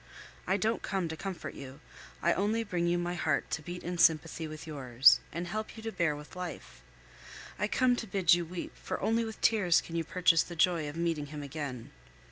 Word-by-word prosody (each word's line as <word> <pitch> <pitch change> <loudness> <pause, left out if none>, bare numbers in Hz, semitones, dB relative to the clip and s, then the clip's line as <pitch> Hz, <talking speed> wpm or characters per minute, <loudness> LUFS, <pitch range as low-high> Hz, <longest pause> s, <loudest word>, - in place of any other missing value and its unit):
I 190 +2 +2
don't 220 +3 0
come 190 -3 -1
to 160 - -4
comfort 190 +2 -6
you; 135 +1 -10 0.4
I 170 - +4
only 215 +4 0
bring 180 -5 -1
you 175 0 +2
my 175 0 -2
heart 180 - -1
to 150 - -1
beat 175 +3 -7
in 175 0 -4
sympathy 160 0 +3
with 155 +1 -8
yours, 135 -5 +5
and 170 +3 -4
help 215 +6 -5
you 220 - -9
to 225 - -3
bear 170 -6 +1
with 150 +4 -11
life. 180 - -7 0.8
I 210 - +1
come 250 +3 +3
to 225 - -4
bid 185 -3 +4
you 175 0 +2
weep, 170 +1 -7
for - - -5
only 225 +1 +1
with 220 -1 -6
tears 195 -7 +4
can 165 - -8
you 165 - 0
purchase 170 0 +3
the 175 - -6
joy 165 -2 +2
of 145 - -8
meeting 165 -3 -1
him 150 0 -7
again. 140 -4 -6
170 Hz, 215 wpm, -31 LUFS, 155-190 Hz, 0.8 s, yours